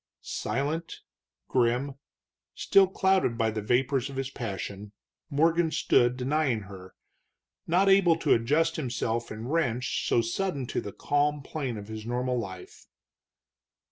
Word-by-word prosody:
Silent, 150 +5 -3 0.5
grim, 125 +2 +1 0.6
still 195 -1 +4
clouded 190 -10 +1
by 115 -1 +1
the 110 0 -3
vapors 130 +4 +1
of 135 - -8
his 135 0 -3
passion, 100 -3 -6 0.4
Morgan 165 +3 +2
stood 125 -5 +2
denying 130 -3 0
her, 95 -2 -12 0.7
not 180 +4 +3
able 195 -4 +5
to - - +3
adjust 150 +8 +1
himself 120 -4 -2
in 110 +2 -6
wrench 130 -5 -1
so - - +3
sudden 140 +5 -2
to - - -3
the 100 - -7
calm 145 +3 0
plane 135 -6 -4
of 105 -1 -8
his 110 0 -7
normal 125 +2 -1
life. 95 -5 -9
130 Hz, 135 wpm, -28 LUFS, 115-155 Hz, 0.7 s, able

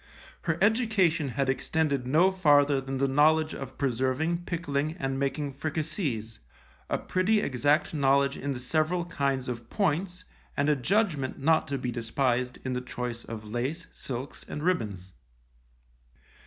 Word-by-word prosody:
Her 165 -1 +1
education 205 - +3
had 135 +2 -1
extended 140 0 0
no 165 +8 +4
farther 145 -6 +4
than 135 0 -4
the 140 +1 +2
knowledge 155 +3 +3
of 135 -1 -7
preserving, 140 +7 0
pickling 155 -2 -2
and 135 -5 -2
making 140 +1 -1
fricasees, 145 - -3 0.5
a - - +1
pretty 190 +4 +1
exact 145 +1 +1
knowledge 140 -1 +3
in 140 - -3
the 125 - -5
several 155 +6 +1
kinds 140 -6 -1
of 120 -2 -5
points 180 -1 -1 0.3
and 145 +1 +2
a 150 - +4
judgment 150 - 0
not 160 +3 +2
to 140 - -2
be 125 -1 -3
despised 125 +1 0
in 130 - -1
the 125 - -2
choice 125 -2 -5
of 110 -1 -7
lace, 130 +10 -3
silks 130 +1 -5
and 150 - -5
ribbons. 105 - -1
140 Hz, 145 wpm, -28 LUFS, 130-160 Hz, 0.5 s, no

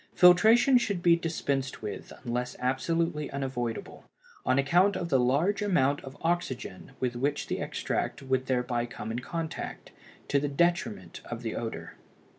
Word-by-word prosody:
Filtration 220 +9 +7
should 200 -7 -2
be 170 -1 +6
dispensed 140 -7 -2
with 105 - -6
unless 125 0 -2
absolutely 150 +4 0
unavoidable, 130 - -4 0.4
on 130 - +3
account 175 +8 +4
of 170 -2 -3
the 135 - +4
large 145 +12 +2
amount 145 -9 +2
of 135 +1 -10
oxygen 135 - -2
with 125 -1 -1
which 140 +4 -1
the - - -3
extract - - -2
would 130 -1 0
thereby 125 -2 0
come 110 -2 -6
in 115 - -2
contact, 165 +4 -5 0.4
to 140 - +2
the 145 +1 -1
detriment 140 - 0
of 120 0 -6
the 115 - -3
odor. 115 -1 -5
140 Hz, 150 wpm, -29 LUFS, 125-170 Hz, 0.4 s, Filtration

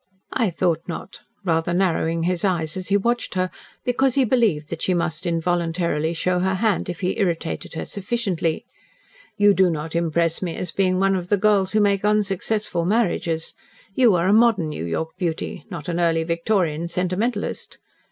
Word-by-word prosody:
"I 230 -5 +2
thought 165 -1 0
not," 180 +2 -7 0.3
rather 165 0 +1
narrowing 165 -3 +1
his 175 0 0
eyes 165 -5 0
as 185 -1 -5
he 200 - +3
watched 235 +1 -1
her, 185 0 0 0.3
because 250 +1 +2
he 270 -2 +4
believed 215 - +1
that - - -5
she 185 - +1
must 170 0 -2
involuntarily 170 -1 0
show 180 +2 0
her 190 +1 +1
hand 205 -2 0
if 175 0 -5
he 185 +4 -1
irritated 170 -4 -2
her - - -3
sufficiently. 200 -3 -2 0.7
"You 205 -1 +5
do 190 -2 +4
not 160 0 -4
impress 170 0 +1
me 175 -3 -3
as 180 - -4
being 185 -1 +1
one 195 0 +3
of 180 -1 -4
the 205 - +3
girls 200 -1 +2
who 215 - +4
make 200 -1 +2
unsuccessful 210 -2 0
marriages. 175 -5 0 0.4
You 235 -3 +4
are 170 0 +1
a 195 - +4
modern 220 -8 +4
New 115 - -4
York 160 - -2
beauty 170 -4 -3
not 170 -6 -7
an 175 0 -1
early 165 -1 +2
Victorian 170 -1 0
sentimentalist." 180 +7 -2
180 Hz, 175 wpm, -22 LUFS, 165-200 Hz, 0.7 s, You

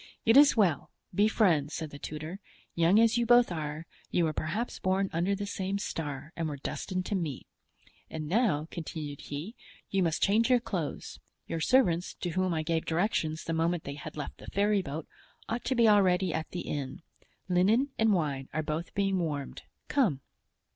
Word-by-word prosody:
"It 225 - +5
is 285 -3 +7
well; 185 -9 +2 0.2
be 205 +4 +4
friends," 165 -10 +2
said 160 -3 -5
the 145 - -9
tutor; 155 +6 -6 0.3
"young 170 +5 +4
as 230 +1 +4
you 235 - +1
both 240 -3 +6
are, 155 -1 -4 0.2
you 175 - +2
were 155 - -1
perhaps 175 +12 -3
born 190 +1 0
under 175 +5 +1
the 205 +1 -4
same 195 -1 -2
star 150 -5 -5
and 165 -2 -2
were 145 - -5
destined 185 +6 -4
to - - -3
meet. 165 -9 -2 0.6
And 155 -1 -5
now," 180 -5 +1
continued 155 -3 -6
he, 150 +10 -6 0.4
"you 195 - +2
must 165 -2 +1
change 220 +4 +3
your 250 -1 +5
clothes; 180 -10 -4 0.3
your 165 - -3
servants, 180 -7 +2
to 175 - -4
whom 185 +1 0
I 160 -2 -1
gave 160 0 -1
directions 160 -2 0
the 165 - -3
moment 165 +1 0
they 140 - -5
had 145 +1 -8
left 145 - -6
the - - -12
ferryboat, 195 -7 0 0.4
ought 235 +2 -3
to 260 - +1
be 235 -2 +5
already 190 -4 +4
at 160 0 -3
the 175 - -4
inn. 140 0 -5 0.4
Linen 200 +10 +3
and 225 -1 +4
wine 145 -8 -1
are 155 - -1
both 155 +3 -4
being 195 -2 +1
warmed; 150 -5 -3 0.3
come." 205 - +1
175 Hz, 185 wpm, -30 LUFS, 155-205 Hz, 0.6 s, is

